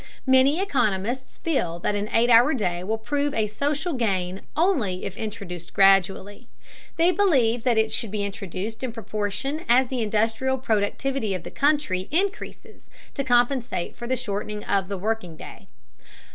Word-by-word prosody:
Many 265 +4 +4
economists 245 - -1
feel 180 - -1
that 210 - 0
an 205 +1 -2
eight 240 +2 +3
hour 240 +6 +6
day 180 -6 -2
will 220 +4 -1
prove 290 +5 -1
a 220 - +2
social 290 - -2
gain 190 -6 -1 0.2
only 265 - +1
if 195 - -5
introduced 200 -6 -7
gradually. 195 +3 +3 0.5
They 340 +2 +4
believe 270 - +2
that 240 -3 +3
it 220 0 +2
should 230 - -2
be 205 0 -2
introduced 200 +1 -5
in 255 -3 -3
proportion 215 - -3
as 250 +1 +4
the 255 -3 -2
industrial 225 +5 0
productivity 220 0 -1
of 180 - -6
the - - -8
country 285 -11 +1
increases 380 +6 -3 0.2
to 275 - -2
compensate 245 -6 +1
for 240 - -7
the 260 - +1
shortening 210 0 -4
of 195 -2 0
the 200 0 -4
working 185 -4 -3
day. - - -11
225 Hz, 160 wpm, -24 LUFS, 200-265 Hz, 0.5 s, hour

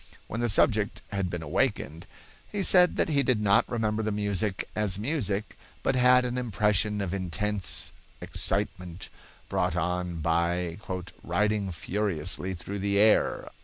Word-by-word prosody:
When 115 - -4
the 120 - +1
subject 105 0 +2
had 100 -2 -1
been 85 -2 -4
awakened, 80 - -1 0.4
he 205 -2 -1
said 180 -1 +5
that - - +1
he 140 -3 +3
did 125 -4 +2
not 100 -2 +3
remember 110 -2 0
the 110 0 -1
music 100 -1 -1
as 105 -3 +1
music, 105 - -2 0.3
but 135 - +1
had 125 0 +5
an 125 0 -2
impression 105 -3 +1
of 95 -2 -3
intense, 100 +2 -1 0.3
excitement, 90 0 -3 0.4
brought - - 0
on 90 0 -1
by 85 +2 0 0.4
"riding 100 +2 0
furiously 95 0 -2
through 100 +4 -6
the 100 +1 0
air." 105 +1 +3
100 Hz, 140 wpm, -28 LUFS, 90-110 Hz, 0.4 s, said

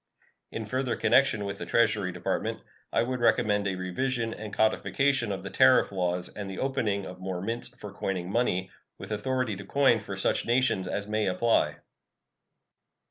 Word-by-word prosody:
In 110 - -4
further 130 +2 -1
connection 110 -6 +3
with 100 0 -5
the - - -4
Treasury 105 -5 +2
Department - - -2 0.3
I 115 - +2
would 125 +1 -2
recommend 105 -3 +2
a 95 - -1
revision 115 +6 -2
and 110 -1 -7
codification 120 +2 +1
of 95 -1 -4
the 100 - -6
tariff - - +5
laws 90 -2 -1
and 100 -2 -7
the 95 - -6
opening 110 -7 -1
of 90 0 -9
more 95 -1 -4
mints 115 +5 -2
for 105 -4 -9
coining 95 -2 -3
money, 95 -5 0 0.3
with - - -9
authority 125 +1 -1
to 100 - -8
coin 125 +2 +3
for 100 -2 -6
such 95 - +1
nations 120 -6 +1
as 100 +2 -3
may 110 -1 0
apply. 110 +5 +2
105 Hz, 170 wpm, -28 LUFS, 95-120 Hz, 0.3 s, tariff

